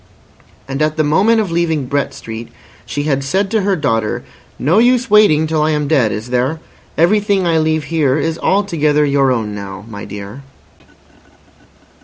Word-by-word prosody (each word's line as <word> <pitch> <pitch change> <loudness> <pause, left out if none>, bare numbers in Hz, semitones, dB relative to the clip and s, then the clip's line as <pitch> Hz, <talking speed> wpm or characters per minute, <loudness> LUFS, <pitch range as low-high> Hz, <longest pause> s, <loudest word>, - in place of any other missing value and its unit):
And 135 +2 -4
at 155 +1 0
the 155 - +2
moment 200 +10 +3
of 195 -5 -4
leaving 165 -4 0
Brett 140 +2 -1
Street 115 +1 -8 0.4
she 145 - -3
had 140 -2 0
said 190 +8 -1
to 220 -2 +1
her 195 0 +1
daughter: 115 -9 -1 0.3
"No 165 - +2
use 245 0 +2
waiting 205 -8 +5
till 155 -1 0
I 155 - +2
am 150 -2 0
dead, 135 -8 +2
is 110 +4 -5
there? 130 +6 0 0.4
Everything 200 +2 +2
I 165 -2 +2
leave 155 0 0
here 150 -3 0
is 165 +2 -2
altogether 155 -7 +1
your 140 -2 +2
own 110 -4 -2
now, 100 0 -8
my 100 -3 -8
dear." 100 +5 -8
150 Hz, 170 wpm, -16 LUFS, 130-170 Hz, 0.4 s, waiting